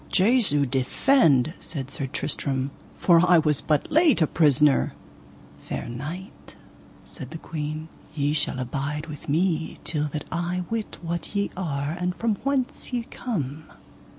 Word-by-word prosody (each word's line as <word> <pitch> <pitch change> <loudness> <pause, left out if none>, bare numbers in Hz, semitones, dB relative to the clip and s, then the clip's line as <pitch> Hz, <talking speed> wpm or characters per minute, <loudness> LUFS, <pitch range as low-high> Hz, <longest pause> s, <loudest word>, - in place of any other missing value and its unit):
Jesu 195 - +4
defend! 140 - +3
said 135 -4 -6
Sir 140 - -3
Tristram, 135 0 -2 0.3
for 170 -2 +5
I 180 -1 +6
was 150 -3 +2
but 150 -2 0
late 320 - +5
a - - +5
prisoner. 150 -2 +3 0.7
Fair - - -5
knight, 150 +11 -7 0.5
said 130 -6 -8
the 165 - -6
queen, 155 -1 -5 0.3
ye 145 -1 +1
shall 150 -3 -1
abide 140 +4 -3
with 150 -3 -9
me 165 +1 +1
till 150 -2 0
that 150 0 -5
I 175 +2 -1
wit 225 -2 -3
what 170 +3 -4
ye 200 0 0
are 145 -6 -2
and 180 0 -1
from 225 -3 0
whence 270 0 -1
ye 245 -2 -1
come. 155 - -4
155 Hz, 145 wpm, -25 LUFS, 145-180 Hz, 0.7 s, I